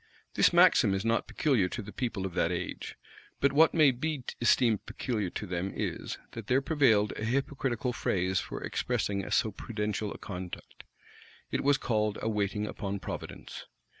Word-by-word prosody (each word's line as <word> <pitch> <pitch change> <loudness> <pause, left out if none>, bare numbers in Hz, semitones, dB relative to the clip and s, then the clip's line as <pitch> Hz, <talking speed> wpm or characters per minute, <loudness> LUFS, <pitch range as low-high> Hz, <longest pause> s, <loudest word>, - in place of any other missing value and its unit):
This - - +5
maxim 95 - +5
is 95 +3 -3
not 115 0 +1
peculiar 120 -12 +1
to 120 - -4
the 105 - -9
people 115 -7 -2
of 95 - -4
that - - +1
age; - - -4 0.4
but 140 0 +3
what 160 +4 +5
may 155 -4 +6
be 140 +2 -3 0.2
esteemed 115 -2 +3
peculiar 110 -3 -2
to 105 - -5
them 90 0 -2
is, - - -3
that 115 -2 -8
there 130 +1 +4
prevailed 130 -9 +3
a - - -4
hypocritical 130 +1 -1
phrase 95 -3 0
for - - -6
expressing 100 -5 -1
so 110 - +2
prudential 105 -1 -3
a - - -7
conduct: 90 -3 -8 0.7
it - - -1
was 140 0 +4
called 110 -6 0
a 110 - -1
waiting 105 0 -1
upon 100 -2 -4
providence. - - -7
110 Hz, 165 wpm, -30 LUFS, 100-130 Hz, 0.7 s, may